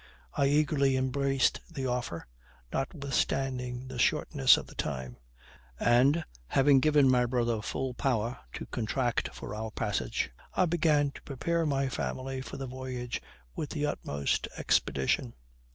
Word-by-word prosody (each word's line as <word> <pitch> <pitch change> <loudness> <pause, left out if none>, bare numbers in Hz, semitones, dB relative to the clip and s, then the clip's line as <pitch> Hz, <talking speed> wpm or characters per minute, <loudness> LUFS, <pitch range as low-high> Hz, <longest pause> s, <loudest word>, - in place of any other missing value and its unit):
I 140 - +2
eagerly 140 -2 +3
embraced 135 +1 +1
the 135 - -4
offer, 125 -10 -2 0.5
notwithstanding 135 -3 -1
the - - -6
shortness 65 - +4
of - - -5
the - - -13
time; 65 -4 -4 0.6
and, 135 +7 +4 0.2
having 135 - +5
given 150 -1 +5
my 125 -1 +4
brother 120 -2 0
full 130 +4 -3
power 120 -2 -1
to - - -5
contract 120 +1 -1
for - - -7
our 110 +1 -4
passage, 105 -10 -2 0.2
I 185 - +4
began 155 -4 +2
to - - -12
prepare 165 +4 -1
my 135 -1 +1
family 130 +1 -3
for - - -7
the 135 - -4
voyage 125 -1 -5 0.3
with 150 - -3
the 150 -2 -1
utmost 70 - -1
expedition. 65 -2 +1
130 Hz, 135 wpm, -30 LUFS, 120-140 Hz, 0.6 s, having